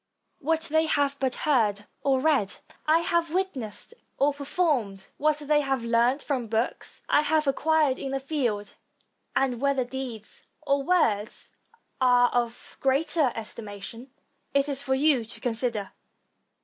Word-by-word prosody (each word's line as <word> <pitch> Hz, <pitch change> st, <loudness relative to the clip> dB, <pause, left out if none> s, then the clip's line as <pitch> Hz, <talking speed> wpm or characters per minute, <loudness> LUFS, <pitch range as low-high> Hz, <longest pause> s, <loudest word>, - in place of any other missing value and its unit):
What 320 Hz, +3 st, 0 dB
they 315 Hz, 0 st, +1 dB
have 285 Hz, -2 st, +1 dB
but 260 Hz, -2 st, 0 dB
heard 215 Hz, -8 st, +2 dB, 0.2 s
or 270 Hz, -2 st, +2 dB
read, 275 Hz, -9 st, +2 dB, 0.3 s
I 320 Hz, +2 st, +5 dB
have 335 Hz, -1 st, 0 dB
witnessed 275 Hz, -, -3 dB, 0.2 s
or 285 Hz, +1 st, +3 dB
performed. 275 Hz, -, -1 dB
What 305 Hz, 0 st, +2 dB
they 295 Hz, 0 st, +2 dB
have 270 Hz, -3 st, -1 dB
learned 235 Hz, +4 st, +2 dB
from 255 Hz, -5 st, -2 dB
books, 225 Hz, +2 st, -3 dB
I 295 Hz, -, +4 dB
have 305 Hz, 0 st, +1 dB
acquired 290 Hz, 0 st, +2 dB
in 275 Hz, -, -4 dB
the 270 Hz, -, -1 dB
field; 245 Hz, -8 st, -2 dB, 0.6 s
and 255 Hz, -3 st, +1 dB
whether 280 Hz, -2 st, +2 dB
deeds 245 Hz, -4 st, -7 dB, 0.2 s
or 280 Hz, 0 st, +2 dB
words 235 Hz, -, 0 dB, 0.5 s
are 245 Hz, -1 st, +5 dB
of 240 Hz, -1 st, -3 dB
greater 275 Hz, +1 st, +2 dB
estima 215 Hz, -2 st, -7 dB
tion, 235 Hz, +5 st, -8 dB, 0.5 s
it 280 Hz, 0 st, +3 dB
is 280 Hz, -1 st, -2 dB
for 265 Hz, -1 st, 0 dB
you 275 Hz, -3 st, +3 dB
to 225 Hz, -, -11 dB
consider. 230 Hz, -4 st, -2 dB
270 Hz, 145 wpm, -27 LUFS, 235-295 Hz, 0.6 s, I